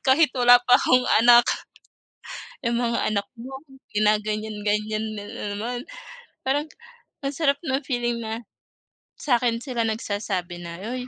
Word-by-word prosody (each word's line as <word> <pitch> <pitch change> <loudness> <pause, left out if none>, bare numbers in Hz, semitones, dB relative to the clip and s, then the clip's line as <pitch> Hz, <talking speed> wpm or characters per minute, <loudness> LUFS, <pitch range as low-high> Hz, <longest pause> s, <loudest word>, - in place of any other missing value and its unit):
Kahit 280 +2 +5
wala 245 0 +8
pa 250 - +7
akong 255 0 +3 0.2
anak. 240 0 +7 1.2
"Yung 235 0 +1
mga 235 -1 0
anak 200 -1 -1
mo 255 +3 -9 0.4
ginaganyan-ganyan 215 0 0
na 205 - -6 0.3
naman." 240 +4 -4 0.7
Parang 290 +3 +1 0.6
ang 275 - -1
sarap 280 -3 +2
ng 265 +1 0
feeling 240 -3 -1
na, 225 +1 -4 0.8
sa'kin 240 -3 +1
sila 250 -4 -2
nagsasabi 205 -5 -3
na, 170 +1 -8
"Uy, 255 0 -5
235 Hz, 125 wpm, -24 LUFS, 210-250 Hz, 1.2 s, wala